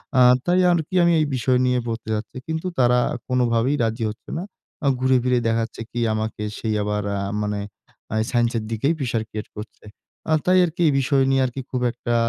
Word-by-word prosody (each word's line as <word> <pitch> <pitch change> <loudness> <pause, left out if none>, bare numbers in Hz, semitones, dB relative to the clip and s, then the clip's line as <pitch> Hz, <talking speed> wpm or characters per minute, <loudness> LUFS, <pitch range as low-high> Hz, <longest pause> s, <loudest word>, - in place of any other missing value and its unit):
এ্যা 130 - +5 0.2
তাই 180 +1 +3
আরকি 170 +2 -1
আমি 170 - +4
এই - - +2
বিষয় 125 +1 +2
নিয়ে 125 0 +2
পড়তে 115 -1 -4
যাচ্ছি। 105 +4 -6
কিন্তু 160 +3 -3
তারা 125 0 +4 0.3
কোনভাবেই 125 +1 +1
রাজি 115 +1 -1
হচ্ছে 105 - -10
না। 175 - -3 0.6
ঘুরে 130 0 +3
ফিরে 125 -1 +2
দেখাচ্ছে 115 0 -1
কি 120 - -3
আমাকে 110 0 -3 0.4
আবার 105 0 -1
এ্যা 100 - -2 0.2
মানে 105 -1 -2 0.5
আ - - -1 0.2
সাইন্স 120 -1 +2
এর 110 - -3
দিকে 115 +5 0
প্রেশার 115 -4 -1
ক্রিয়েট 105 0 -6
করছে। 105 0 -10 0.4
এ্যা 160 - +3
তাই 185 +1 +4
আরকি 175 +1 -5
এই 145 - +3
বিষয় 135 0 +2
নিয়ে 135 0 +3 0.3
খুব 125 -1 -1
একটা 120 0 -4
125 Hz, 185 wpm, -22 LUFS, 115-135 Hz, 0.6 s, এ্যা